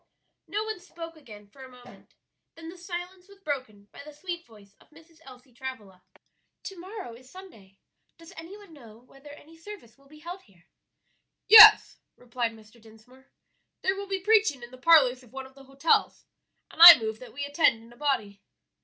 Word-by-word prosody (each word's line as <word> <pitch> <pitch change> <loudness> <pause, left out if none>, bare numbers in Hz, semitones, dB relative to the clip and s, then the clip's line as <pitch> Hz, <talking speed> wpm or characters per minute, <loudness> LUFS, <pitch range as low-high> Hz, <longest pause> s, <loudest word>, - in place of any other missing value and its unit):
No 420 +1 -4
one 440 -3 -7
spoke 335 -2 -12
again 220 -9 -16
for 265 +6 -17
a 260 - -13
moment, 250 -1 -19 0.4
then 330 0 -12
the 360 - -13
silence 360 +1 -9
was 400 0 -19
broken 255 - -7
by - - -14
the 300 - -13
sweet 340 +3 -8
voice 205 -3 -20
of - - -25
Mrs. 325 +1 -22
Elsie 255 -1 -17
Travilla: 225 -8 -11 0.6
"To 385 -3 -10
morrow 375 - -10
is 250 +2 -18
Sunday; 225 - -17 0.4
does 335 0 -17
any 330 +5 -12
one 410 -5 -18
know 230 -7 -17
whether 270 +4 -19
any 295 +2 -16
service 330 - -14
will 275 - -25
be 305 +2 -18
held 345 +4 -11
here?" 175 -4 -28 0.8
"Yes," 430 0 +8 0.2
replied 240 -1 -6
Mr. 220 +1 -20
Dinsmore; 230 +4 -21 0.5
"there 380 - -1
will 400 0 -8
be 390 -1 -4
preaching 410 - 0
in 240 - -12
the 255 - -14
parlors 265 -4 +3
of 245 -3 -22
one 265 0 -9
of 265 - -18
the 270 0 -18
hotels, 275 +4 -1 0.5
and - - -8
I 340 -2 +12
move 220 -1 -7
that 255 - -14
we 285 +2 -7
attend 285 -6 0
in 230 +1 -18
a - - -20
body." 225 -9 -4
280 Hz, 190 wpm, -25 LUFS, 240-345 Hz, 0.8 s, I